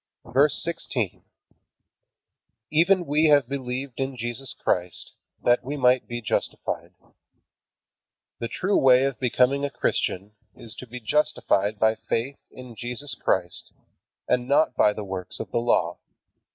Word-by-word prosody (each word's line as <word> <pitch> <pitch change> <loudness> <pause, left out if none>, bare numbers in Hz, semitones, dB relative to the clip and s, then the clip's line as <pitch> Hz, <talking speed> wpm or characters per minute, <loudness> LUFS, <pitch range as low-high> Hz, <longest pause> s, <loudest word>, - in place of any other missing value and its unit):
VERSE 140 +3 +4
16. 130 - -2 1.5
Even 175 +4 +3
we 150 +2 +2
have 145 -4 +5
believed 130 -1 -5
in 135 -1 -2
Jesus 120 +2 -3
Christ, 90 -1 -1 0.3
that 120 +1 +3
we 140 +3 -4
might 125 -1 +3
be 120 0 -5
justified. - - -2 1.4
The 115 - -2
true 185 - 0
way 130 -1 +6
of 135 -2 -1
becoming 130 +2 +2
a 140 - 0
Christian 100 -6 -1 0.2
is 115 - -8
to 125 - -9
be 125 +2 -8
justified 110 -5 +1
by 110 +1 +3 0.2
faith 130 +5 -1
in 125 -2 -11
Jesus 125 +4 -2
Christ, 90 -6 -1 0.5
and 125 0 +1
not 150 +3 +3
by 105 - +4
the 105 0 -6
works 95 -1 -4
of - - -6
the - - +1
Law. 90 -7 +1
125 Hz, 140 wpm, -25 LUFS, 115-140 Hz, 1.5 s, way